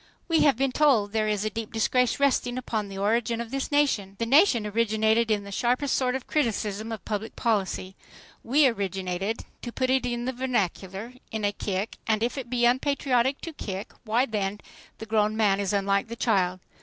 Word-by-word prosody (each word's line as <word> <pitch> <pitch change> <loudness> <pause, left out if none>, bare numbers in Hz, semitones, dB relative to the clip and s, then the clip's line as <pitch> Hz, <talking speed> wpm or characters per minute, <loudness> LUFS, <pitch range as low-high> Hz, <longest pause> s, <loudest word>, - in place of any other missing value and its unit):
We 330 -3 +3
have 280 -6 +4
been 270 0 +1
told 250 -8 +3
there 215 0 0
is 210 -1 0
a 215 - -1
deep 225 0 -5
disgrace 240 +3 +1
resting 255 -3 +1
upon 220 -4 -2
the 195 -1 -8
origin 225 +3 +1
of 235 0 -5
this 275 +1 -3
nation. 245 -10 +1
The 230 - -1
nation 270 - +4
originated 220 +1 +2
in 210 -2 +1
the 200 - -9
sharpest 250 +6 +1
sort 255 -1 +1
of 265 - -4
criticism 220 -6 -1
of 220 -3 -6
public 215 +1 -4
policy. 195 -4 -1 0.5
We 280 +5 +4
originated, 195 -2 -1 0.2
to 240 - -6
put 255 +1 0
it 260 -1 +2
in 240 0 -2
the 260 - -2
vernacular, 220 -3 -2 0.2
in 220 -1 -2
a 205 - +2
kick, 200 +1 -3
and 220 0 +1
if 240 - -1
it 260 -4 -6
be 240 -1 +2
unpatriotic 260 0 +1
to 330 - -6
kick, 200 -4 -6
why 235 +3 +2
then 205 -3 -3 0.4
the 220 - -7
grown 215 0 +1
man 200 -3 +3
is 200 -2 -1
unlike 200 0 +1
the 230 - -6
child. 185 -6 +1
225 Hz, 195 wpm, -26 LUFS, 205-250 Hz, 0.5 s, have